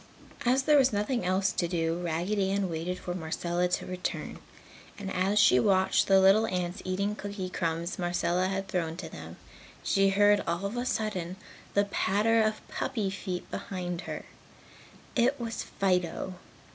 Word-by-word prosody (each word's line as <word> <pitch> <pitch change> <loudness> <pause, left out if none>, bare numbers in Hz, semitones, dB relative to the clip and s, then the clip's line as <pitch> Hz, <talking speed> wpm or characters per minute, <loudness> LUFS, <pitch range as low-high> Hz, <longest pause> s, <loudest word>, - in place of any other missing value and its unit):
As 260 +2 +4
there 295 +1 +5
was 265 -1 +4
nothing 210 +4 0
else 190 +1 +2
to 175 - -1
do, 165 -1 -1
Raggedy 180 +4 0
Ann 195 -2 0
waited 165 +3 -3
for 180 - -5
Marcella 175 +1 -1
to 180 - -1
return. 185 0 -4 0.6
And 195 -2 -5
as 190 +3 +1
she 165 -11 +6
watched 190 +5 +3
the 195 0 +6
little 195 +4 +5
ants 180 0 -2
eating 200 +3 -1
cookie 200 -3 -5
crumbs 170 +1 -2
Marcella 175 +1 +1
had 195 0 -2
thrown 170 -3 -2
to 170 -3 -6
them, 80 +1 -9 0.5
she 195 0 +3
heard 205 +1 +4
all 170 +3 -1
of 200 +4 -3
a 245 +1 -2
sudden 185 -7 -2 0.4
the 200 0 +4
patter 210 +3 +2
of 215 0 -1
puppy 220 -7 -2
feet 185 -2 -5
behind 180 -2 -4
her. - - -5 0.9
It 255 +3 +2
was 230 -1 -3
Fido. 180 -1 -1
190 Hz, 160 wpm, -29 LUFS, 175-205 Hz, 0.9 s, she